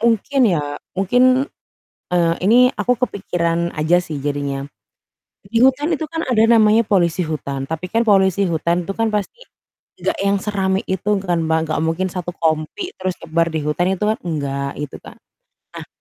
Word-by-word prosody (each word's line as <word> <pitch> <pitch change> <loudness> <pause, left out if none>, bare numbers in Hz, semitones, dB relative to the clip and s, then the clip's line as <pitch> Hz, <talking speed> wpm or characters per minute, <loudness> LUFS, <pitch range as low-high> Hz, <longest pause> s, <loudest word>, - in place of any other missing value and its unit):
mungkin 235 +4 +1
ya, 145 -5 -1 0.2
mungkin, 250 +7 +3 0.7
eee, 170 -2 +3
ini 250 +5 +6
aku 250 0 0
kepikiran 170 -7 -1
aja 160 +3 +3
sih 160 -4 -6
jadinya. 140 -1 -2 0.8
Di 220 +4 -1
hutan 265 +6 +3
itu 315 +1 -2
kan 325 +1 -4
ada 245 -4 +1
namanya 220 -1 +5
polisi 180 -4 +2
hutan, 140 -3 -4
tapi 160 +3 -5
kan 230 +1 +2
polisi 195 -1 +3
hutan 170 +1 0
itu 195 - -2
kan 225 0 +1
pasti, 210 - -3 0.5
nggak - - -2
yang 200 0 +2
serame 195 -1 -1
itu 190 +2 -3 0.2
kan 175 -2 0
Mbak, 160 0 +2
nggak 155 - -1
mungkin 165 +4 0
1 180 -2 -5
kompi, 160 - -2
terus 185 -1 -2
nyebar 165 +1 +1
di 160 -1 -3
hutan 150 +4 0
itu 200 - -2
kan 215 +1 +1
enggak, 140 -4 -3
gitu 145 -2 -6
kan. - - -13 0.6
Nah - - -8
185 Hz, 170 wpm, -19 LUFS, 160-220 Hz, 0.8 s, ini